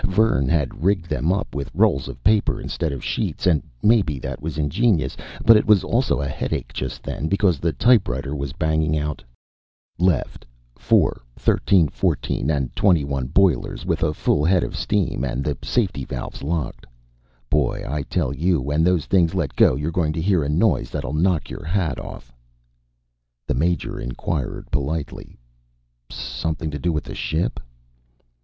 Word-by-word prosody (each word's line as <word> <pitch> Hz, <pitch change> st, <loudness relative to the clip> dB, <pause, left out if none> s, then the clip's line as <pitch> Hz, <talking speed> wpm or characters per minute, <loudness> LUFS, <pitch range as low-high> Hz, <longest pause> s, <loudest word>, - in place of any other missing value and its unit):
Vern 95 Hz, -8 st, +2 dB
had 75 Hz, -2 st, -1 dB
rigged 95 Hz, -2 st, +2 dB
them 80 Hz, +3 st, 0 dB
up 100 Hz, +3 st, -2 dB
with 70 Hz, 0 st, -4 dB
rolls 95 Hz, -9 st, +2 dB
of 60 Hz, -, -9 dB
paper 105 Hz, +1 st, +3 dB
instead 80 Hz, -3 st, -3 dB
of 70 Hz, -3 st, -6 dB
sheets, -, -, -2 dB
and 80 Hz, -6 st, +3 dB, 0.2 s
maybe 105 Hz, -10 st, +3 dB
that 65 Hz, -, -6 dB
was 75 Hz, 0 st, -4 dB
ingenious, 80 Hz, +5 st, +1 dB, 0.3 s
but 115 Hz, -, +9 dB
it 105 Hz, -, +3 dB
was 105 Hz, -4 st, +5 dB
also 120 Hz, -, +1 dB
a 70 Hz, -, -1 dB
headache 65 Hz, -, -3 dB
just 65 Hz, 0 st, -5 dB
then. 80 Hz, -, -3 dB
Because 95 Hz, -4 st, +2 dB
the 85 Hz, +3 st, 0 dB
typewriter 70 Hz, -, +2 dB
was 70 Hz, -1 st, -4 dB
banging 80 Hz, -1 st, 0 dB
out: 75 Hz, 0 st, -3 dB, 0.8 s
LEFT 90 Hz, -5 st, 0 dB, 0.3 s
FOUR 65 Hz, -, +2 dB
THIRTEEN 90 Hz, -6 st, +3 dB
FOURTEEN 70 Hz, -, -1 dB
AND 70 Hz, -5 st, -1 dB
TWENTYONE 70 Hz, -9 st, +2 dB
BOILERS 85 Hz, 0 st, +1 dB
WITH 85 Hz, -3 st, -1 dB
A 80 Hz, -, +2 dB
FULL 75 Hz, -1 st, +1 dB
HEAD 90 Hz, +2 st, +3 dB
OF -, -, -5 dB
STEAM 100 Hz, -10 st, 0 dB
AND 65 Hz, 0 st, -2 dB
THE 75 Hz, 0 st, -1 dB
SAFETY 90 Hz, -, 0 dB
VALVES 65 Hz, -, -6 dB
LOCKED 70 Hz, -5 st, -3 dB, 0.6 s
BOY 75 Hz, -4 st, +1 dB
I 75 Hz, +1 st, -2 dB
TELL 70 Hz, -2 st, -1 dB
YOU 85 Hz, +3 st, +1 dB
WHEN 75 Hz, +4 st, 0 dB
THOSE 90 Hz, -3 st, +2 dB
THINGS 90 Hz, -2 st, +2 dB
LET 85 Hz, -8 st, -1 dB
GO -, -, +5 dB
YOURE 75 Hz, +4 st, -2 dB
GOING 80 Hz, -3 st, 0 dB
TO 80 Hz, -, -2 dB
HEAR 95 Hz, -3 st, +3 dB
A 70 Hz, -, -2 dB
NOISE 75 Hz, -, +2 dB
THATLL 65 Hz, -, -4 dB
KNOCK 80 Hz, -5 st, +1 dB
YOUR -, -, -7 dB
HAT 80 Hz, -2 st, -1 dB
OFF -, -, -9 dB, 1.1 s
The -, -, -1 dB
Major 85 Hz, +7 st, -1 dB
inquired 60 Hz, +3 st, -4 dB
politely: 70 Hz, +1 st, -3 dB, 0.7 s
"Something 80 Hz, -1 st, -4 dB
to 75 Hz, -, -5 dB
do 85 Hz, +6 st, 0 dB
with 75 Hz, -3 st, -2 dB
the -, -, -8 dB
ship?" 80 Hz, +2 st, -2 dB
80 Hz, 165 wpm, -22 LUFS, 70-90 Hz, 1.1 s, but